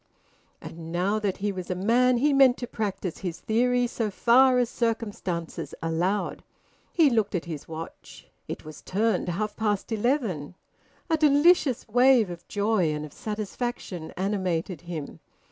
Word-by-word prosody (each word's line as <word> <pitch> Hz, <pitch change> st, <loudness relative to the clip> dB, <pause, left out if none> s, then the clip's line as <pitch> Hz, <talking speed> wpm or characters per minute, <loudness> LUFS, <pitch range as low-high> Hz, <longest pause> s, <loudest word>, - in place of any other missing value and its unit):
And 165 Hz, 0 st, -9 dB
now 190 Hz, +5 st, +1 dB
that 205 Hz, -3 st, -1 dB
he 205 Hz, +1 st, -1 dB
was 185 Hz, -2 st, -6 dB
a 185 Hz, -, -1 dB
man 240 Hz, +6 st, +3 dB
he 285 Hz, +4 st, +3 dB
meant 270 Hz, -2 st, +6 dB
to 245 Hz, -, -4 dB
practise 200 Hz, -6 st, -4 dB
his 180 Hz, -3 st, -5 dB
theory 245 Hz, +2 st, +2 dB
so 230 Hz, -2 st, -2 dB
far 250 Hz, +5 st, +5 dB
as 245 Hz, -1 st, +3 dB
circumstances 210 Hz, -8 st, -3 dB
allowed. 175 Hz, +5 st, -1 dB, 0.5 s
He 315 Hz, -5 st, +4 dB
looked 215 Hz, -4 st, +1 dB
at 180 Hz, -, -2 dB
his 160 Hz, -4 st, -7 dB
watch. 165 Hz, 0 st, -9 dB, 0.2 s
It -, -, -6 dB
was 155 Hz, -1 st, -10 dB
turned 215 Hz, -1 st, 0 dB
half 210 Hz, +5 st, -2 dB
past 210 Hz, -1 st, -1 dB
eleven. 215 Hz, -, -1 dB, 0.5 s
A 325 Hz, -2 st, +2 dB
delicious 295 Hz, -2 st, +4 dB
wave 245 Hz, -3 st, +4 dB
of 170 Hz, -, -10 dB
joy 205 Hz, -5 st, +1 dB
and 150 Hz, 0 st, -3 dB
of 150 Hz, -, -12 dB
satisfaction 210 Hz, -5 st, -5 dB
animated 185 Hz, -3 st, -1 dB
him. 170 Hz, -4 st, -7 dB
210 Hz, 150 wpm, -26 LUFS, 175-245 Hz, 0.5 s, meant